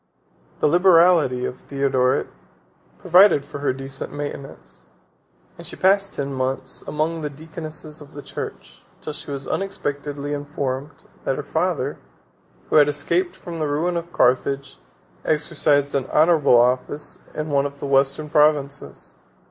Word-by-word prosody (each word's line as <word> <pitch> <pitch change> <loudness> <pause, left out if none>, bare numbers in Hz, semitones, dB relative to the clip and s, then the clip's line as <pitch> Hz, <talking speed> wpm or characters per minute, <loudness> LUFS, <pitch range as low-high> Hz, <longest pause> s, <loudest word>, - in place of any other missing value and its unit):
The - - +5
liberality 170 -6 +5
of 125 - -5
Theodoret 135 -2 +1 0.7
provided 180 -4 +5
for 145 - -8
her 145 - +1
decent 135 +1 -6
maintenance; 140 - -8 0.7
and - - -7
she - - -2
passed 195 +1 +3
ten 140 -1 -3
months 130 0 -3
among 160 +2 -1
the 150 - -2
deaconesses 155 0 -8
of 145 - -13
the 145 - -8
church; - - -8 0.2
till 155 - -5
she - - -9
was 140 -1 -5
unexpectedly 145 -6 -3
informed, 145 -1 -3 0.3
that - - 0
her - - -4
father, - - -1 0.7
who - - +5
had 145 -1 +7
escaped 170 +5 0
from 170 -3 -8
the 155 - 0
ruin 160 +5 0
of 170 0 -4
Carthage, 135 +1 +1 0.4
exercised 150 -2 +1
an 135 -2 0
honorable 150 -6 +5
office 125 +4 0 0.2
in 155 0 -3
one 140 0 +2
of 140 0 -13
the - - -5
Western 140 +2 +2
provinces. 145 - 0
145 Hz, 140 wpm, -22 LUFS, 135-155 Hz, 0.7 s, had